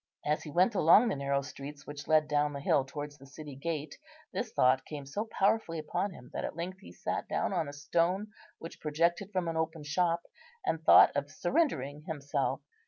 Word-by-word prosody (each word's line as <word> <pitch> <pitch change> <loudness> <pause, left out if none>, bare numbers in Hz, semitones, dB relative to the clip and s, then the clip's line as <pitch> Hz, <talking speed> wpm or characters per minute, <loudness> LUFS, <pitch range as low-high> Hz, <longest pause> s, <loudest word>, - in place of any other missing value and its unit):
As 150 +3 +1
he 155 - -8
went 180 +8 +3
along 200 +6 +6
the - - 0
narrow 140 0 0
streets 140 +1 -9
which 145 0 -8
led 155 -1 +4
down 145 0 +1
the 140 - -4
hill 140 -1 +2
towards 145 +1 -7
the 135 - -14
city 145 0 -9
gate 150 0 -4 0.3
this - - -3
thought 130 +1 +3
came 145 -2 -7
so 205 +11 -3
powerfully 200 -5 +1
upon 160 +6 -2
him 125 -8 -13
that - - -3
at - - -4
length 180 +3 -5
he 195 - -13
sat - - -3
down - - -1
on 170 -5 0
a - - -8
stone 175 +8 0 0.3
which 165 - -10
projected 170 +6 0
from 185 -3 -1
an 165 -1 -2
open 160 -1 -2
shop, 170 +3 +1 0.4
and 160 - 0
thought - - +8
of 145 0 -1
surrendering 150 - 0
himself. 145 -4 -1
155 Hz, 200 wpm, -31 LUFS, 145-175 Hz, 0.4 s, thought